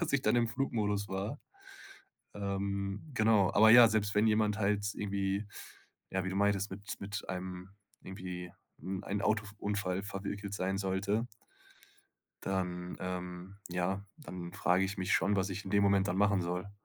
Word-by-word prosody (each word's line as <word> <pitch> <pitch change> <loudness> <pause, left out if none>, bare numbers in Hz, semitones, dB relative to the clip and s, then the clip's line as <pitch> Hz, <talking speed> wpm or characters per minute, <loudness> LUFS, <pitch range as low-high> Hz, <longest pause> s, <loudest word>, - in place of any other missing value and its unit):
dass 170 - -1
ich 140 -1 +2
dan - - +3
im 120 -1 +3
Flugmodus 105 -4 -1
war. 100 +8 -3 1.0
Ähm, 100 0 -2
genau. 110 -4 +4
Aber 110 +2 +7
ja, 120 0 +10
selbst 105 -2 0
wenn 105 +2 +4
jemand 105 -1 +2
halt 100 0 +1
irgendwie, 100 0 -1 0.7
ja, 95 0 0
wie - - -1
du 95 - -4
meintest, 100 0 +2
mit 100 +2 -6
mit 100 +1 -5
einem 90 0 -5 0.3
irgendwie 90 -2 -6 0.3
in 95 +1 -4
ein 100 +1 -2
Autof 105 0 0
Unfall 100 -2 -1
verwickelt 100 0 -5
sein 95 -1 -1
sollte 100 +4 0 1.2
dann, 90 -2 -2
ähm, 90 +1 -5
ja 90 +2 -1
dann 90 - -8
frage 95 -1 +2
ich 100 +1 -3
mich 95 0 -1
schon, 100 +1 +3
was 95 +1 0
ich 95 +2 -5
in 95 - -6
dem 100 0 +4
Moment 100 -1 +3
dann 90 - 0
machen 100 -1 +3
soll. 90 +3 -3
100 Hz, 165 wpm, -33 LUFS, 95-105 Hz, 1.2 s, ja